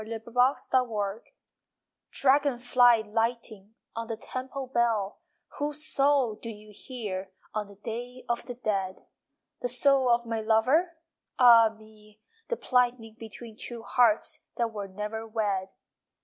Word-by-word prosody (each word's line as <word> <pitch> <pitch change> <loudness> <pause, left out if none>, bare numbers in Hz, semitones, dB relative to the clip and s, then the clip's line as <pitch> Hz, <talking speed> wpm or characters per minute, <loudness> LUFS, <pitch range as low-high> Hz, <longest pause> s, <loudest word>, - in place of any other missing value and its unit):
LOVE - - -12 0.2
IN - - -17
JAPAN 250 -1 +2
I 200 +1 -2 0.9
Dragon 275 -1 +3
fly 245 -2 +4
lighting 225 -1 -3 0.2
On 230 0 -4
the 225 -1 -4
temple 260 +3 -5
bell, 230 -5 0 0.4
Whose 295 +1 -2
soul 275 -4 +3
do 225 +2 -8
you 210 -1 -11
hear 200 -8 -5 0.2
On 210 -1 -2
the 200 - -14
Day 240 +4 -7
of 235 0 -1
the 245 - -5
Dead? 195 -5 -2 0.6
The 245 - -1
soul 260 +1 +4
of 235 0 +3
my 225 -1 -2
lover? 260 +11 +2 0.4
Ah 235 -3 +8
me, 215 -1 -18 0.3
the 475 - -2
plighting 245 -3 +1
Between 225 0 -9
two 235 0 -7
hearts 235 -3 +2 0.2
That 230 -2 -1
were 205 -2 -5
never 210 +3 -5
wed! 200 -4 -2
230 Hz, 140 wpm, -28 LUFS, 215-250 Hz, 0.9 s, Ah